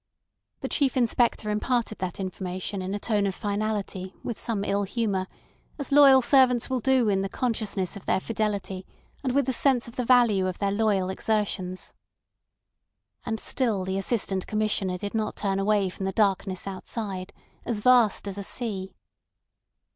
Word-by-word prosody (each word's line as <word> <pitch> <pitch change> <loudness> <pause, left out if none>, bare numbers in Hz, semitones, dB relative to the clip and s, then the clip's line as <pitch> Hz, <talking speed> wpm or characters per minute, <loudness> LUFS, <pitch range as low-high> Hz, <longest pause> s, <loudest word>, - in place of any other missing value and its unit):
The - - -2
Chief 275 -3 +1
Inspector 235 -2 +2
imparted 215 +1 -1
that 185 0 -4
information 185 +1 -4
in 190 +2 -3
a - - -3
tone 205 -2 +1
of 190 - -3
finality 205 -3 -3
with 235 - -4
some 215 -4 -2
ill 200 0 0
humour, 200 -2 -1 0.5
as 285 -1 -5
loyal 275 -2 +7
servants 250 -1 +4
will 260 - +1
do 260 -1 +3
in 195 -2 +2
the 195 - -2
consciousness 215 -7 -1
of 200 - -11
their - - +2
fidelity 200 -3 -2 0.4
and 255 -2 0
with 280 -2 +3
the 260 - 0
sense 250 -1 +2
of 235 - -12
the 250 - 0
value 235 -6 +4
of 185 - -3
their 200 -1 0
loyal 200 -3 +1
exertions. 190 -3 -2 1.3
And 220 -1 -2
still 215 -8 0
the 190 +1 -1
Assistant 195 -3 -1
Commissioner 210 -4 0
did 200 +2 -5
not 220 -1 -1
turn 195 -1 -1
away 200 0 +2
from 190 +1 -5
the - - -1
darkness 195 -2 0
outside, 195 -1 -5 0.3
as 220 -3 -2
vast 240 -4 +4
as 200 0 -4
a - - -4
sea. 195 -4 -4
210 Hz, 165 wpm, -26 LUFS, 195-235 Hz, 1.3 s, loyal